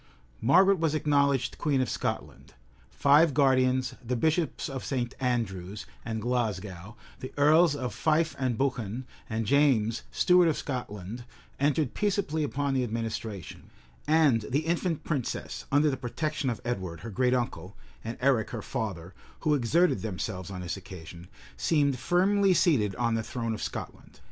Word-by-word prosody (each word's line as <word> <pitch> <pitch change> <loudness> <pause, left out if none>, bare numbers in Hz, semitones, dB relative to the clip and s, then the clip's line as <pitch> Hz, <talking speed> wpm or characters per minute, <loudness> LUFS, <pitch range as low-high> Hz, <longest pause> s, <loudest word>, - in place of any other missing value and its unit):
Margaret 185 - +5
was 160 -2 +1
acknowledged 140 -4 +1
queen 145 -3 +1
of 130 - +1
Scotland; 60 - -4 0.3
five 145 +1 +4
guardians, 130 -2 +3
the 125 +1 -2
bishops 160 +4 0
of 135 -3 -5
St. 125 -3 -2
Andrews 105 -6 -2 0.2
and 110 -1 -3
Glasgow, 105 -5 -2 0.2
the 130 - -7
earls 155 +2 +5
of 130 -3 -4
Fife 160 0 +1
and 130 -4 0
Buchan, 125 -3 -2 0.2
and 110 0 -2
James, 115 -4 +3
steward 180 -1 +4
of 160 - +1
Scotland, 120 -4 -5 0.4
entered 145 -1 +1
peaceably 195 -7 0
upon 140 -1 -1
the 130 -1 +1
administration; 110 -4 -5 0.4
and 150 -7 +4
the 145 +4 0
infant 170 -1 -1
princess, 140 -7 -3
under 145 +2 +4
the 135 - -3
protection 145 +3 -2
of 115 -4 -4
Edward, 95 -9 -3
her 115 - -7
great 125 +4 +2
uncle, 100 -7 -3 0.3
and 115 +1 -5
Eric, 125 -5 +2
her 115 -3 -5
father, 95 -8 -4 0.3
who 155 -2 +2
exerted 145 - +2
themselves 95 -2 -4
on 95 -2 -6
this 90 +1 -4
occasion, 90 -2 -10 0.3
seemed 145 -5 +1
firmly 190 +5 +3
seated 110 - +2
on 115 +2 0
the 115 - 0
throne 115 0 -3
of 110 - -5
Scotland. - - -7
130 Hz, 150 wpm, -28 LUFS, 110-150 Hz, 0.4 s, Margaret